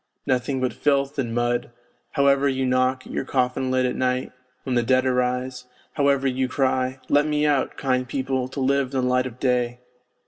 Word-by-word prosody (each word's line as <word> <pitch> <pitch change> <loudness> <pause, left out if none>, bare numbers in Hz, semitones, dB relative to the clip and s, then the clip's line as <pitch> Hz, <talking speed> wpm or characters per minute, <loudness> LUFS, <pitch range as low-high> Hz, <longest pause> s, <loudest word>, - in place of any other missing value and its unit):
Nothing 130 +1 0
but 130 -1 -1
filth 140 0 0
and 120 -4 -1
mud, 120 +1 0 0.4
however 140 -1 +3
you 130 0 -1
knock 130 0 +1
at - - -10
your - - -1
coffin 130 -1 0
lid 130 0 +2
at 125 - -1
night, 130 0 -1 0.3
when 130 - -2
the 120 - +3
dead 130 +2 +2
arise, 125 0 -1 0.3
however 140 -2 +2
you 130 0 0
cry: 130 0 0
' - - -27
Let 145 +1 +3
me 150 0 +1
out, 145 -3 +1
kind 130 -2 0
people, 130 -1 -2
to 130 - -7
live 140 +1 +2
in 130 - +2
the 125 - 0
light 125 0 +2
of 125 0 -11
day 125 -2 0
130 Hz, 200 wpm, -23 LUFS, 125-135 Hz, 0.4 s, however